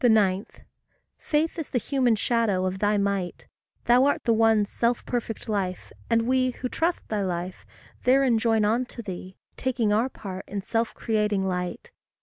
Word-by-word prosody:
9. 210 Hz, -4 st, +4 dB, 0.7 s
Faith 320 Hz, +3 st, 0 dB
is 315 Hz, -, -4 dB
the -, -, 0 dB
human 245 Hz, 0 st, +2 dB
shadow 210 Hz, -4 st, +1 dB
of 185 Hz, +1 st, -2 dB
thy 210 Hz, +1 st, +2 dB
might. 200 Hz, -3 st, -1 dB, 0.4 s
Thou 245 Hz, +2 st, +5 dB
art 285 Hz, -, +1 dB
the 230 Hz, -, +3 dB
one 225 Hz, -1 st, +4 dB
self 235 Hz, +3 st, -1 dB
perfect 235 Hz, -2 st, -3 dB
life, 195 Hz, -4 st, -2 dB, 0.2 s
and 230 Hz, -1 st, +3 dB
we 255 Hz, +1 st, +2 dB
Who 250 Hz, 0 st, -5 dB
trust 340 Hz, +6 st, -1 dB
thy 210 Hz, -2 st, -1 dB
life, 180 Hz, -1 st, -4 dB, 0.4 s
therein 255 Hz, -2 st, +4 dB
join 225 Hz, -2 st, +2 dB
on 230 Hz, +4 st, +2 dB
to 240 Hz, -1 st, -9 dB
thee, 185 Hz, -1 st, -7 dB, 0.2 s
Taking 240 Hz, -5 st, 0 dB
our 230 Hz, +5 st, +2 dB
part 190 Hz, -6 st, -7 dB
in 200 Hz, 0 st, -4 dB
self 230 Hz, +2 st, -1 dB
creating 210 Hz, -3 st, 0 dB
light. 180 Hz, -1 st, -4 dB
220 Hz, 165 wpm, -26 LUFS, 200-245 Hz, 0.7 s, Thou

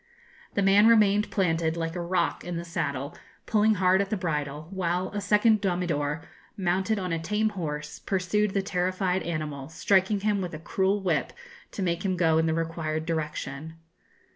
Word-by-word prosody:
The 200 Hz, -, +2 dB
man 200 Hz, +3 st, +6 dB
remained 210 Hz, -2 st, +4 dB
planted, 165 Hz, -4 st, 0 dB
like 165 Hz, 0 st, -3 dB
a 175 Hz, -, -2 dB
rock, 175 Hz, +2 st, 0 dB
in 175 Hz, -1 st, -4 dB
the 170 Hz, -, -5 dB
saddle, 145 Hz, -5 st, -3 dB, 0.3 s
pulling 215 Hz, 0 st, +3 dB
hard 190 Hz, 0 st, +3 dB
at 200 Hz, -, -2 dB
the 215 Hz, -, -1 dB
bridle, 150 Hz, -4 st, -3 dB
while 180 Hz, -1 st, -1 dB
a 205 Hz, -, -4 dB
second 210 Hz, +1 st, +3 dB
domidor, 165 Hz, -5 st, -1 dB, 0.3 s
mounted 190 Hz, +3 st, 0 dB
on 185 Hz, -3 st, -2 dB
a 165 Hz, -, -1 dB
tame 210 Hz, +6 st, 0 dB
horse, 150 Hz, -6 st, -5 dB
pursued 195 Hz, +2 st, 0 dB
the 195 Hz, -, +1 dB
terrified 185 Hz, 0 st, 0 dB
animal, 155 Hz, -4 st, -4 dB
striking 190 Hz, +4 st, +2 dB
him 205 Hz, -1 st, +1 dB
with 175 Hz, -3 st, -4 dB
a -, -, -7 dB
cruel 190 Hz, +4 st, 0 dB
whip 170 Hz, -5 st, 0 dB, 0.4 s
to 195 Hz, -, -3 dB
make 170 Hz, -1 st, -1 dB
him 185 Hz, -2 st, 0 dB
go 160 Hz, -2 st, +3 dB
in 160 Hz, -, +2 dB
the 160 Hz, -, +1 dB
required 160 Hz, -1 st, -2 dB
direction. 160 Hz, -1 st, -4 dB
180 Hz, 175 wpm, -27 LUFS, 160-195 Hz, 0.4 s, man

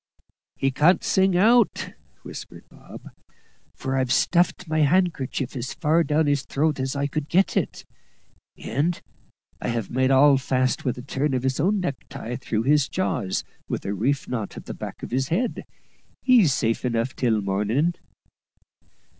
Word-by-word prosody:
"He 135 Hz, -, 0 dB
can't 160 Hz, +7 st, +3 dB
sing 190 Hz, -1 st, +2 dB
out," 230 Hz, +3 st, +3 dB, 0.3 s
whispered -, -, -10 dB
Bob, -, -, -13 dB, 0.6 s
"for 135 Hz, 0 st, -3 dB
I've 130 Hz, -2 st, 0 dB
stuffed 180 Hz, +1 st, +2 dB
my 155 Hz, 0 st, +1 dB
han'kercher 150 Hz, -5 st, +1 dB
as 130 Hz, +1 st, -4 dB
far 165 Hz, +1 st, +2 dB
down 155 Hz, 0 st, +1 dB
his 145 Hz, -1 st, +1 dB
throat 150 Hz, +1 st, -1 dB
as 130 Hz, +1 st, -2 dB
I 140 Hz, 0 st, 0 dB
could 145 Hz, +1 st, -3 dB
get 190 Hz, +3 st, +2 dB
it, -, -, -2 dB, 0.7 s
and 150 Hz, +9 st, -1 dB, 0.6 s
have 115 Hz, -4 st, -2 dB
made 130 Hz, +1 st, +2 dB
all 135 Hz, +1 st, +6 dB
fast 130 Hz, -1 st, 0 dB
with 125 Hz, -2 st, -1 dB
a 125 Hz, -, -7 dB
turn 135 Hz, +1 st, -1 dB
of 125 Hz, -, -2 dB
his 130 Hz, 0 st, -1 dB
own 195 Hz, +6 st, +2 dB
necktie 130 Hz, -6 st, -5 dB
through 110 Hz, -2 st, -2 dB
his 145 Hz, +1 st, +3 dB
jaws 185 Hz, -, -1 dB, 0.3 s
with -, -, -3 dB
a 100 Hz, -, -1 dB
reef 130 Hz, +8 st, -1 dB
knot 115 Hz, -5 st, -4 dB
at -, -, -9 dB
the -, -, -6 dB
back -, -, -8 dB
of -, -, -6 dB
his 130 Hz, +2 st, 0 dB
head. 230 Hz, -, -1 dB, 0.6 s
He's 235 Hz, -, +5 dB
safe 115 Hz, -3 st, 0 dB
enough 120 Hz, 0 st, -1 dB
till 115 Hz, -4 st, +1 dB
morning." 105 Hz, -, 0 dB
135 Hz, 160 wpm, -24 LUFS, 125-165 Hz, 0.7 s, all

